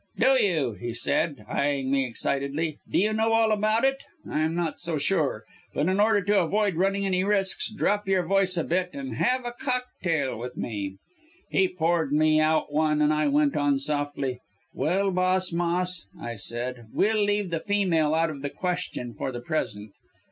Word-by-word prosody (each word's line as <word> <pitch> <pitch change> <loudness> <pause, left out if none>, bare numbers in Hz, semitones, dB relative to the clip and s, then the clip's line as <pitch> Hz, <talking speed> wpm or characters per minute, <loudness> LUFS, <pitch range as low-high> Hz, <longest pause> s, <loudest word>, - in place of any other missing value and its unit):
"'Do 265 - +4
you,' 155 - +1
he 115 +4 -6
said, 140 -1 -1
eyeing 140 +1 0
me 135 -1 +2
excitedly. 140 +5 -2
'Do - - 0
you 210 +3 +2
know 220 +1 +1
all 225 -1 +3
about 215 +3 +2
it? 270 0 +2 0.3
I'm 155 +2 0
not 170 -2 -2
so 165 -2 -2
sure, 145 - +1 0.3
but 145 - +1
in 190 +2 +1
order 210 -1 +4
to 205 +1 +3
avoid 200 +4 +1
running 195 +4 +1
any 185 -1 +1
risks, 195 -1 +1
drop 210 -1 0
your 190 -2 +2
voice 190 0 +2
a 165 - +1
bit 180 +2 -1
and 275 -1 -5
have 255 0 +1
a 240 - -3
cocktail 240 - -2
with 125 +1 -7
me!' 100 -4 -4 0.6
"He 190 - +3
poured 165 -4 0
me 155 +1 +4
out 155 -1 +1
one, 155 0 +2
and 150 0 +3
I 150 0 +1
went 145 0 +2
on 145 -1 +2
softly, 145 -2 -2 0.3
'Well, 190 +8 +1
boss 185 0 +1
Moss,' 175 - 0
I 120 - -5
said, 120 +2 -5
'we'll 215 0 +2
leave 205 -2 0
the 165 - 0
female 170 -6 +1
out 165 0 +2
of 140 -3 -8
the 145 - -2
question 175 -9 -3
for 120 - -4
the 120 -1 -6
present. 110 -8 -3
165 Hz, 185 wpm, -26 LUFS, 140-195 Hz, 0.6 s, Do